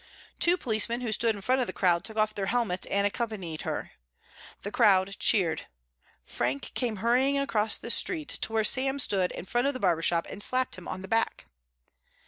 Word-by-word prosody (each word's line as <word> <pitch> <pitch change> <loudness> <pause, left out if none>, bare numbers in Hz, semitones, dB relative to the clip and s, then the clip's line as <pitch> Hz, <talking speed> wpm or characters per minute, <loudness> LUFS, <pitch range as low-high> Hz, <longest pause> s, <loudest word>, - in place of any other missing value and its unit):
Two 350 +1 +3
policemen 235 -2 0
who 235 -3 -3
stood 225 0 +2
in 200 - -8
front 255 +5 +1
of 245 - -1
the - - -4
crowd 175 -2 +2
took 220 +1 -6
off 215 0 +2
their 200 -2 -3
helmets 215 -5 0
and 200 0 +2
accompanied 205 -7 -3
her. - - -4 0.7
The 205 - -5
crowd 200 -4 +3
cheered. 170 -7 +2 0.6
Frank 130 +3 -3
came 240 -4 -1
hurrying 250 +7 +2
across 225 -6 +2
the 235 - -4
street 315 +1 +1
to - - -1
where 220 -1 +1
Sam 265 +5 +2
stood 195 -8 0
in - - -7
front 240 +7 0
of 280 - -1
the - - -4
barber 175 -6 +1
shop 170 0 +1
and 200 - -8
slapped 255 +3 +1
him 185 - -11
on 185 - -6
the - - -7
back. 225 +3 -1
215 Hz, 200 wpm, -28 LUFS, 190-245 Hz, 0.7 s, Two